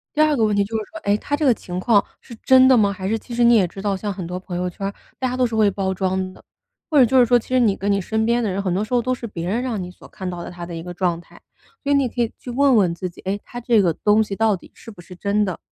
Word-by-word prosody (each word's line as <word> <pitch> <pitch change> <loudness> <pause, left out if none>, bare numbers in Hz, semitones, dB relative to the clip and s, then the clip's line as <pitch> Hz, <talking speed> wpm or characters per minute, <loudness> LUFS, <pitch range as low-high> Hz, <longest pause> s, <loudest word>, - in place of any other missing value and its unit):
第 305 - +3
二 310 -1 +4
个 230 - +1
问 210 -1 +2
题 200 - +3
就 215 +3 -6
是 215 - -3
说： 325 - -8
“诶， 200 0 +2
他 290 - -2
这 300 - 0
个 255 - +6
情 180 -4 -6
况 205 +1 +3 0.2
是 235 - -12
真 260 0 +6
的 260 - +6
吗？” 205 -4 +3
还 190 -1 -5
是 220 +3 0
其 240 +2 -10
实 240 - +2
你 235 0 +6
也 195 -5 +4
知 195 +3 -9
道， 200 -1 0
像 205 +2 -4
很 185 -2 -6
多 180 +2 -5
朋 185 -1 -6
友 180 0 -1
圈 195 +3 -7
儿， 200 - -5 0.3
大 260 - 0
家 250 - -3
都 255 - +3
是 230 -2 -3
会 215 -2 +4
包 190 -1 -2
装 185 0 -2
的， - - -18 0.5
或 305 - +2
者 260 - +8
就 260 +3 +3
是 245 - +6
说， 245 +1 +4
其 235 - -6
实 255 0 +3
你 220 -5 +3
跟 200 +1 -1
你 200 0 +1
身 220 +4 -1
边 235 +1 +1
的 215 - 0
人 195 +2 -2
很 185 -3 -1
多 195 +3 0
时 215 - -6
候 245 - +3
都 255 +2 -1
是 245 -2 -6
别 170 -5 -5
人 220 +6 0
让 240 -6 -3
你 180 0 -7
所 - - -16
看 190 - -8
到 175 -1 -6
的 - - -7
他 175 -1 -8
的 170 -1 -7
一 165 - -5
个 175 +1 -7
状 175 -2 -1
态。 - - -19 0.4
所 285 - -1
以 - - +5
你 275 -2 +2
可 240 - -3
以 230 - 0
去 - - -9
问 270 +1 +3
问 185 -5 +3
自 180 +2 -4
己： 175 - -15
“诶， 195 +2 -1
他 245 - -8
这 235 -3 +3
个 175 -4 +2
东 210 +6 +3
西 200 -2 -5
到 220 0 +2
底 - - -18
是 - - -13
不 205 - -13
是 180 +1 -13
真 205 +3 0
的？” 185 -4 -4
205 Hz, 375 characters per minute, -21 LUFS, 185-240 Hz, 0.5 s, 者